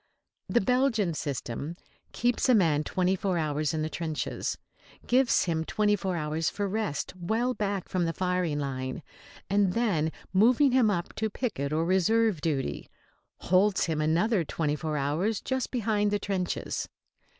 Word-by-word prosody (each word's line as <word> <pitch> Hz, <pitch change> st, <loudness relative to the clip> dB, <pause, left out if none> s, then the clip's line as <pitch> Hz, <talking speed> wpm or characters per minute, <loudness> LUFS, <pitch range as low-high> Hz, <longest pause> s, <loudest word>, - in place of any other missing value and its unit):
The 240 Hz, -, +3 dB
Belgian 230 Hz, -5 st, +2 dB
system 140 Hz, +1 st, -4 dB, 0.4 s
keeps 245 Hz, +2 st, +1 dB
a 250 Hz, -, +7 dB
man 160 Hz, -7 st, +3 dB
twenty 185 Hz, +3 st, +1 dB
four 190 Hz, -1 st, -1 dB
hours 150 Hz, -2 st, 0 dB
in 155 Hz, -1 st, -1 dB
the -, -, -1 dB
trenches, 160 Hz, -2 st, -3 dB, 0.5 s
gives 255 Hz, 0 st, +3 dB
him 160 Hz, -2 st, -1 dB
twenty 210 Hz, +4 st, +1 dB
four 190 Hz, -3 st, -2 dB
hours 155 Hz, 0 st, -1 dB
for 205 Hz, -1 st, -2 dB
rest 205 Hz, -7 st, -2 dB
well 220 Hz, +8 st, 0 dB
back 200 Hz, -4 st, -2 dB
from 180 Hz, -2 st, 0 dB
the 165 Hz, -, 0 dB
firing 180 Hz, -3 st, -1 dB
line, 130 Hz, 0 st, -4 dB, 0.4 s
and 195 Hz, -2 st, +2 dB
then, 180 Hz, -10 st, +1 dB, 0.2 s
moving 245 Hz, +8 st, +5 dB
him 245 Hz, -4 st, +4 dB
up 175 Hz, -4 st, -2 dB
to 220 Hz, 0 st, 0 dB
picket 205 Hz, -, -3 dB
or 160 Hz, +2 st, +1 dB
reserve 190 Hz, +1 st, +2 dB
duty, 135 Hz, -, -2 dB, 0.5 s
holds 190 Hz, +2 st, +3 dB
him 160 Hz, -2 st, -1 dB
another 175 Hz, +6 st, +2 dB
twenty 150 Hz, -1 st, -1 dB
four 155 Hz, 0 st, -3 dB
hours 160 Hz, +10 st, 0 dB
just 260 Hz, -1 st, -2 dB
behind 210 Hz, -4 st, +1 dB
the 205 Hz, -, +1 dB
trenches. 195 Hz, -3 st, -3 dB
185 Hz, 155 wpm, -28 LUFS, 155-215 Hz, 0.5 s, a